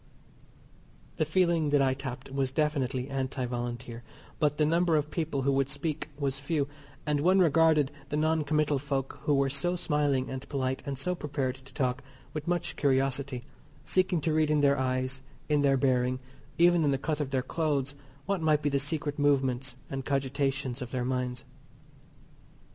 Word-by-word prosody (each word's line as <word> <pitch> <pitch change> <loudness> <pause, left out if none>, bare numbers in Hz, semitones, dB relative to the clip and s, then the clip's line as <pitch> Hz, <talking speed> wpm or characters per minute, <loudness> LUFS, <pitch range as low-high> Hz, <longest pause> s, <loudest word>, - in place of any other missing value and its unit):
The 155 - +2
feeling 170 -1 +2
that 145 -1 +4
I 130 -1 +3
tapped 130 -1 -6
was 135 -1 0
definitely 135 -3 0
Anti 135 -2 -2
Volunteer, 120 -1 -4 0.4
but 150 -2 +2
the 150 - +3
number 170 +1 +3
of 150 0 0
people 155 -5 -1
who 140 - +3
would 135 0 +1
speak 150 +2 -3
was 135 -2 -1
few, 140 0 0 0.4
and 150 -1 +1
one 185 +5 +4
regarded 160 -4 +4 0.2
the 150 - -1
noncommital 155 -2 +2
folk 135 -1 -3
who 145 - +3
were 135 0 +3
so 175 +6 0
smiling 145 -5 +1
and 130 0 -6
polite, 130 -2 -1
and 140 -1 -2
so 180 +7 -1
prepared 145 -6 -2
to 130 0 -15
talk, 125 -1 0 0.3
with 155 0 -5
much 175 -1 -1
curiosity, 135 -2 +1 0.4
seeking 185 -3 +2
to 160 +1 0
read 155 -1 +3
in 150 -1 +3
their 140 -1 +4
eyes, 130 0 -1 0.3
in 150 -1 +3
their 135 -1 +4
bearing, 130 -1 +2 0.4
even 175 -1 +5
in 145 - +3
the 135 - +2
cut 150 +3 -2
of 140 - -2
their 130 -2 0
clothes 145 -4 -1 0.3
what 195 -3 -1
might 155 -1 +3
be 145 - +2
the 140 -1 +1
secret 145 +1 -2
movements 135 -3 +1
and 135 -1 -4
cogitations 135 -1 -1
of 125 - -4
their 125 -1 -2
minds. 125 -1 -2
140 Hz, 175 wpm, -29 LUFS, 130-155 Hz, 0.4 s, even